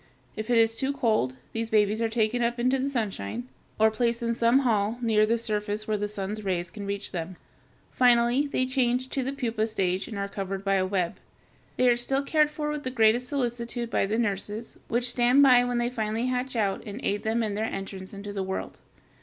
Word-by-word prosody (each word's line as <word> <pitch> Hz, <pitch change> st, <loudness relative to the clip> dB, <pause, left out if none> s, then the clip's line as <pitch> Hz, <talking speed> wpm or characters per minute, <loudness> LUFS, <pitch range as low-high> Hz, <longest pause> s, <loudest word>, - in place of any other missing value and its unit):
If 215 Hz, +1 st, -5 dB
it 240 Hz, -, +4 dB
is 225 Hz, 0 st, +4 dB
too 270 Hz, +4 st, -1 dB
cold, 220 Hz, -, +1 dB, 0.2 s
these 225 Hz, 0 st, -2 dB
babies 215 Hz, 0 st, +2 dB
are 225 Hz, -, +1 dB
taken 225 Hz, +1 st, +1 dB
up 235 Hz, +1 st, 0 dB
into 255 Hz, +2 st, +2 dB
the 270 Hz, +2 st, 0 dB
sunshine, 125 Hz, -, -3 dB, 0.3 s
or 220 Hz, 0 st, +5 dB
placed 235 Hz, +2 st, 0 dB
in 235 Hz, 0 st, +1 dB
some 235 Hz, +3 st, +3 dB
hall 220 Hz, -3 st, +1 dB
near 220 Hz, -3 st, +3 dB
the 230 Hz, +1 st, +2 dB
surface 215 Hz, -2 st, -2 dB
where 215 Hz, -, +1 dB
the 210 Hz, 0 st, -1 dB
sun's 205 Hz, +1 st, -4 dB
rays 175 Hz, -3 st, -2 dB
can 205 Hz, -2 st, -7 dB
reach 200 Hz, 0 st, -4 dB
them. 175 Hz, +1 st, -5 dB, 0.6 s
Finally 245 Hz, +2 st, +4 dB
they 255 Hz, -2 st, 0 dB
change 255 Hz, -1 st, 0 dB
to 270 Hz, -, -1 dB
the 265 Hz, -, -2 dB
pupa 235 Hz, -5 st, -1 dB
stage 190 Hz, -4 st, -1 dB
and 215 Hz, -, -6 dB
are 200 Hz, 0 st, -2 dB
covered 195 Hz, 0 st, -5 dB
by 195 Hz, -, +2 dB
a 190 Hz, -1 st, +2 dB
web. 185 Hz, -3 st, -1 dB, 0.6 s
They 255 Hz, -, +4 dB
are 240 Hz, -, +5 dB
still 270 Hz, +3 st, -1 dB
cared 300 Hz, +1 st, +3 dB
for 300 Hz, 0 st, -3 dB
with 300 Hz, -1 st, -3 dB
the 255 Hz, -, -3 dB
greatest 240 Hz, 0 st, +3 dB
solicitude 240 Hz, -3 st, -3 dB
by -, -, +1 dB
the 215 Hz, +3 st, -1 dB
nurses, 210 Hz, 0 st, -2 dB
which 240 Hz, +2 st, 0 dB
stand 245 Hz, +3 st, +4 dB
by 250 Hz, -3 st, +7 dB
when 245 Hz, -1 st, -1 dB
they 240 Hz, +1 st, 0 dB
finally 220 Hz, 0 st, -2 dB
hatch 255 Hz, 0 st, -2 dB
out 200 Hz, -4 st, 0 dB
and 210 Hz, +2 st, -7 dB
aid 205 Hz, +1 st, 0 dB
them 225 Hz, +1 st, 0 dB
in 210 Hz, -2 st, -2 dB
their 215 Hz, +2 st, -1 dB
entrance 195 Hz, -2 st, -6 dB
into 200 Hz, 0 st, -7 dB
the 195 Hz, -, -2 dB
world. 190 Hz, 0 st, -4 dB
225 Hz, 220 wpm, -27 LUFS, 205-245 Hz, 0.6 s, by